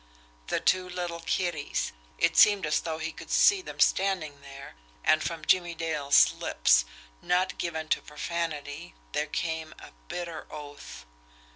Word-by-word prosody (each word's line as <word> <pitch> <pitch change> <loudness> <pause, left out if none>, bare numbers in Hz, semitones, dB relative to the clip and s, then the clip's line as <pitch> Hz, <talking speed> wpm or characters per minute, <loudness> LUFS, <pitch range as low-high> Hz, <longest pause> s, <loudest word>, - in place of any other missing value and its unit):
The - - 0
two 185 0 +1
little 175 -2 -4
kiddies 165 -3 -1 0.3
it - - +2
seemed 205 -4 +6
as 150 - +2
though 160 -1 -4
he 160 0 -4
could - - -11
see 400 -1 +5
them - - -10
standing 170 -7 +1
there 140 0 -11 0.3
and 155 - +4
from 165 -2 -4
Jimmie 175 -2 +2
Dale's 145 - +3
lips, - - +3 0.4
not 185 +1 0
given 160 -2 -3
to - - +2
profanity, 150 - -5 0.2
there 150 - -1
came 160 0 -3
a - - -12 0.2
bitter 170 - -6
oath. 145 - -10
160 Hz, 145 wpm, -28 LUFS, 145-175 Hz, 0.4 s, seemed